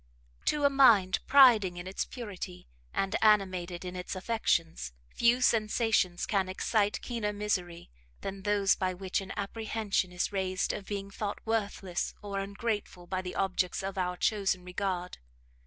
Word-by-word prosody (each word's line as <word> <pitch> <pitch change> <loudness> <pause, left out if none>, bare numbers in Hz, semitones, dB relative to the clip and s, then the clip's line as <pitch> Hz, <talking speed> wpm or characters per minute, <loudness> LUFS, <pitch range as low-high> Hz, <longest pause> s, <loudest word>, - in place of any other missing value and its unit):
To 295 -1 +1
a - - +7
mind 220 -9 +5
priding 230 -10 +6
in 175 - -6
its 190 +1 -3
purity, 190 - -7 0.2
and 195 0 -1
animated 185 -5 +2
in 180 0 -5
its 180 +1 -5
affections, 170 - -1 0.2
few 235 +2 +3
sensations 215 -6 +2
can 195 -3 0
excite 205 +2 +1
keener 230 -4 -2
misery, 185 - -3 0.3
than 195 0 -5
those 205 -1 +3
by 185 -1 -1
which 190 +1 -2
an 195 - -8
apprehension 205 -2 -1
is 180 +2 -1
raised 190 -1 -1
of 200 - -6
being 200 -1 -4
thought 205 0 -3
worthless 200 -5 -2
or 200 -1 -3
ungrateful 200 -2 -3
by 185 +1 -2
the 180 -1 -6
objects 185 -1 0
of 195 0 -4
our 180 -1 -1
chosen 195 -4 0
regard. 180 -1 -3
195 Hz, 150 wpm, -30 LUFS, 185-215 Hz, 0.3 s, a